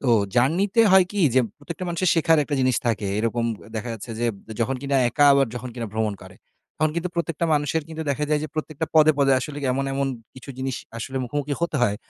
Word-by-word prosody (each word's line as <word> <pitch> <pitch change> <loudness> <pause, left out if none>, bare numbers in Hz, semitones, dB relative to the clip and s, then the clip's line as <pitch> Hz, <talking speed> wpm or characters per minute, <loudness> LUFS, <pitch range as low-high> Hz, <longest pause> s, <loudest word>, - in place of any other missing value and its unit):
তো 135 - -1 0.3
জার্নিতে 185 - +3
হয় 190 -1 +7
কি 205 - -1
যে 130 - +6 0.2
প্রত্যেকটা 170 +5 -7
মানুষের 175 +2 0
শেখার 165 -1 +4
একটা 145 - -3
জিনিস 130 -3 +2
থাকে। 110 -3 0
এরকম 115 +1 0 0.3
দেখা 110 +2 -4
যাচ্ছে 115 +2 -9
যে 120 - +1 0.3
যখন 125 +4 +1
কিনা 140 0 0
একা 145 +5 +3
আবার 140 -1 +4
যখন 125 +1 -5
কিনা 120 -2 -4
ভ্রমণ 110 -1 -1
করে। - - -13 0.4
তখন 155 0 +1
কিন্তু 170 +2 -1
প্রত্যেকটা 170 -1 -1
মানুষের 145 +2 0
কিন্তু 160 0 -5
দেখা 145 +2 -1
যায় 150 -1 +2
যে 155 - -5
প্রত্যেকটা 155 0 -3
পদে, 155 0 +6
পদে 135 -1 +4
আসলে 145 +3 -5
এমন, 135 +1 -1
এমন 140 0 0 0.3
কিছু 130 +2 -10
জিনিস 130 -1 -2 0.2
আসলে 130 +4 -5
মুখোমুখি 145 +3 -3
হতে 170 -3 -1
হয় 105 -3 +2
140 Hz, 215 wpm, -23 LUFS, 125-160 Hz, 0.4 s, হয়